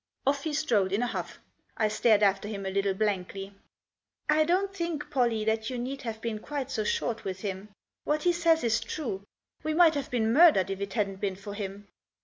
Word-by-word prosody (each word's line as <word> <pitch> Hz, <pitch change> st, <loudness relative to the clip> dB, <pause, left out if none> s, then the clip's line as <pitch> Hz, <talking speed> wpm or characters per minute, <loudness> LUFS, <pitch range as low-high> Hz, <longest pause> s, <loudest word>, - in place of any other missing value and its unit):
Off 280 Hz, +1 st, +1 dB
he 315 Hz, -, -1 dB
strode 235 Hz, -11 st, +1 dB
in 205 Hz, +5 st, +1 dB
a -, -, +2 dB
huff. -, -, -4 dB, 0.4 s
I 215 Hz, -, +3 dB
stared 215 Hz, 0 st, +3 dB
after 195 Hz, 0 st, +2 dB
him 200 Hz, -2 st, -5 dB
a 190 Hz, -, -2 dB
little 195 Hz, 0 st, +1 dB
blankly. 195 Hz, -1 st, -2 dB, 0.7 s
"I 310 Hz, 0 st, +4 dB
don't 385 Hz, +4 st, +1 dB
think, 335 Hz, -5 st, -3 dB
Pollie, 235 Hz, -5 st, +1 dB
that 220 Hz, 0 st, 0 dB
you 255 Hz, -, -4 dB
need 265 Hz, +3 st, -4 dB
have 225 Hz, -4 st, -5 dB
been 225 Hz, -2 st, -3 dB
quite 275 Hz, +2 st, -4 dB
so 225 Hz, -5 st, -1 dB
short 225 Hz, +2 st, -1 dB
with 190 Hz, -1 st, -5 dB
him. 200 Hz, 0 st, -5 dB, 0.3 s
What 300 Hz, +1 st, 0 dB
he 350 Hz, -, +4 dB
says 335 Hz, -1 st, +3 dB
is 230 Hz, -1 st, +2 dB
true; 225 Hz, -3 st, -4 dB, 0.4 s
we 310 Hz, 0 st, -1 dB
might 335 Hz, -1 st, +6 dB
have 285 Hz, -2 st, -3 dB
been 225 Hz, -2 st, +1 dB
murdered 290 Hz, -, +6 dB
if 195 Hz, 0 st, -4 dB
it 200 Hz, -1 st, -4 dB
hadn't 195 Hz, -2 st, -1 dB
been 195 Hz, -2 st, -1 dB
for 200 Hz, +1 st, -8 dB
him." 200 Hz, 0 st, -6 dB
220 Hz, 210 wpm, -28 LUFS, 200-290 Hz, 0.7 s, might